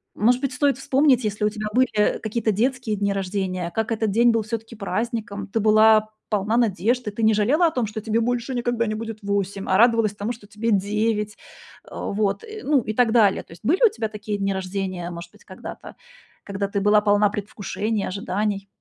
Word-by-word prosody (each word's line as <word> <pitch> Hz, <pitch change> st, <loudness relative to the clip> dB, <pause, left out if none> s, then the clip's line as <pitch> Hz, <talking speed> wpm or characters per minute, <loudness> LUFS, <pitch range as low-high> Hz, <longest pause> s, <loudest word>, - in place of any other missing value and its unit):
Может 245 Hz, +4 st, +3 dB
быть, 275 Hz, -1 st, -2 dB
стоит 280 Hz, +1 st, +1 dB
вспомнить, 265 Hz, -2 st, +2 dB
если 210 Hz, 0 st, -2 dB
у 210 Hz, -, +3 dB
тебя 215 Hz, 0 st, -5 dB
были 235 Hz, -4 st, +2 dB
какие-то 220 Hz, 0 st, 0 dB
детские 245 Hz, +1 st, 0 dB
дни 200 Hz, 0 st, 0 dB
рождения, 190 Hz, -2 st, -2 dB
как 220 Hz, +1 st, -1 dB
этот 220 Hz, -2 st, 0 dB
день 235 Hz, +3 st, +4 dB
был 230 Hz, -1 st, +1 dB
всё-таки 225 Hz, +1 st, -6 dB
праздником, 215 Hz, -1 st, -3 dB
ты 215 Hz, +3 st, -1 dB
была 215 Hz, 0 st, +5 dB, 0.2 s
полна 210 Hz, +2 st, 0 dB
надежд, 230 Hz, +2 st, +1 dB
и 210 Hz, -, -1 dB
ты 220 Hz, -, -6 dB
не 220 Hz, -, +5 dB
жалела 275 Hz, +12 st, +3 dB
о -, -, 0 dB
том, 250 Hz, -6 st, -1 dB
что 215 Hz, +1 st, -6 dB
тебе 220 Hz, +1 st, 0 dB
больше 245 Hz, +2 st, -1 dB
никогда 240 Hz, -1 st, 0 dB
не 215 Hz, -, -2 dB
будет 225 Hz, 0 st, -6 dB
8, 200 Hz, -1 st, -2 dB
а 190 Hz, -, +4 dB
радовалась 230 Hz, -2 st, +4 dB
тому, 205 Hz, +3 st, -3 dB
что 215 Hz, -3 st, -15 dB
тебе 215 Hz, +2 st, -2 dB
9, 210 Hz, +1 st, 0 dB, 0.5 s
э, -, -, -16 dB
вот, 205 Hz, -, -2 dB
и, 435 Hz, -1 st, -9 dB
ну, 285 Hz, -2 st, +3 dB
и 215 Hz, -, -4 dB
так 235 Hz, 0 st, +3 dB
далее. 215 Hz, -5 st, +3 dB
То -, -, -21 dB
есть, 165 Hz, 0 st, -14 dB
были 315 Hz, -, +2 dB
у -, -, +6 dB
тебя 225 Hz, -, -3 dB
такие 210 Hz, -1 st, -4 dB
дни 195 Hz, 0 st, 0 dB
рождения, 185 Hz, -2 st, -4 dB
может 170 Hz, 0 st, -8 dB
быть, -, -, -21 dB
когда-то, -, -, -10 dB, 0.5 s
когда 200 Hz, 0 st, -3 dB
ты 200 Hz, 0 st, -2 dB
была 210 Hz, +1 st, +4 dB
полна 205 Hz, 0 st, +3 dB
предвкушений, 205 Hz, +1 st, -3 dB
ожиданий? 200 Hz, +1 st, -2 dB
215 Hz, 205 wpm, -23 LUFS, 200-235 Hz, 0.5 s, у